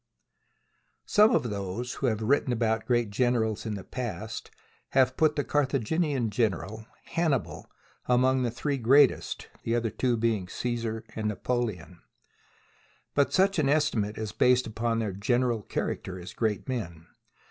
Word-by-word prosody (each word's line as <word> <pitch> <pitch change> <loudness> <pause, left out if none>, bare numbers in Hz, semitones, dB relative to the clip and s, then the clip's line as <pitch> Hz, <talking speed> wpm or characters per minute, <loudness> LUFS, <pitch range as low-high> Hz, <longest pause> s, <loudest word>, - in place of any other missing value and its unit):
SOME 215 +3 +5
of 120 - 0
those 100 +5 -4
who 135 - -1
have 110 -2 0
written 135 +2 +2
about 110 -2 0
great 120 -4 +1
generals 115 -1 0
in 105 - -2
the 95 - -7
past 115 -3 -5 0.4
have 130 -1 +4
put 155 -1 +3
the 145 - 0
Cartha 140 -2 +1
ginian 135 -2 0
general, 110 0 -1 0.2
Hannibal, 160 -6 -1 0.4
among 130 +1 +3
the 125 - +1
three 140 +4 -2
greatest, 135 +3 +3
the 115 - -1
other 115 -2 0
two 125 -2 0
being 110 -5 0
Cassar 115 +1 -3
and 110 -1 -2
Napoleon. 105 -6 -3 1.1
But 140 -1 +2
such 195 -1 +3
an 140 -3 +2
estimate 115 -9 +1
is 110 -1 -4
based 125 +3 +3
upon 115 +1 -1
their 110 -4 -1
general 120 +3 +1
character 95 -2 -4
as 90 +1 -9
great 110 0 -1
men. 85 -11 -4
120 Hz, 145 wpm, -28 LUFS, 110-130 Hz, 1.1 s, SOME